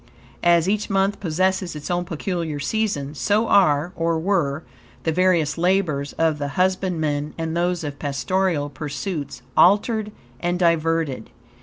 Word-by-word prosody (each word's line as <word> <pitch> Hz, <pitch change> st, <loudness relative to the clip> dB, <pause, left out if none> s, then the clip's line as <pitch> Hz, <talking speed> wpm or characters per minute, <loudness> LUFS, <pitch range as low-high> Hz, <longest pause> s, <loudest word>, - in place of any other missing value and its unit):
As 170 Hz, 0 st, +4 dB
each 210 Hz, +1 st, 0 dB
month 195 Hz, 0 st, +1 dB
possesses 185 Hz, 0 st, 0 dB
its 150 Hz, +3 st, -5 dB
own 175 Hz, 0 st, 0 dB
peculiar 165 Hz, -2 st, -3 dB
season, 150 Hz, -5 st, -1 dB
so 205 Hz, -, +1 dB
are, 160 Hz, -4 st, +3 dB
or 165 Hz, 0 st, 0 dB
were, 160 Hz, -4 st, 0 dB, 0.4 s
the 160 Hz, -, +1 dB
various 170 Hz, -3 st, +2 dB
labors 170 Hz, -6 st, +1 dB
of 160 Hz, -2 st, +1 dB
the 145 Hz, -1 st, -3 dB
husbandman, 165 Hz, -6 st, 0 dB
and 165 Hz, 0 st, -3 dB
those 175 Hz, 0 st, 0 dB
of 145 Hz, -1 st, -5 dB
pastoral 150 Hz, +1 st, -1 dB
pursuits, 145 Hz, -2 st, -5 dB
altered 210 Hz, +3 st, +3 dB, 0.3 s
and 175 Hz, +1 st, -1 dB
diverted. 165 Hz, -7 st, +1 dB
170 Hz, 135 wpm, -22 LUFS, 150-185 Hz, 0.4 s, As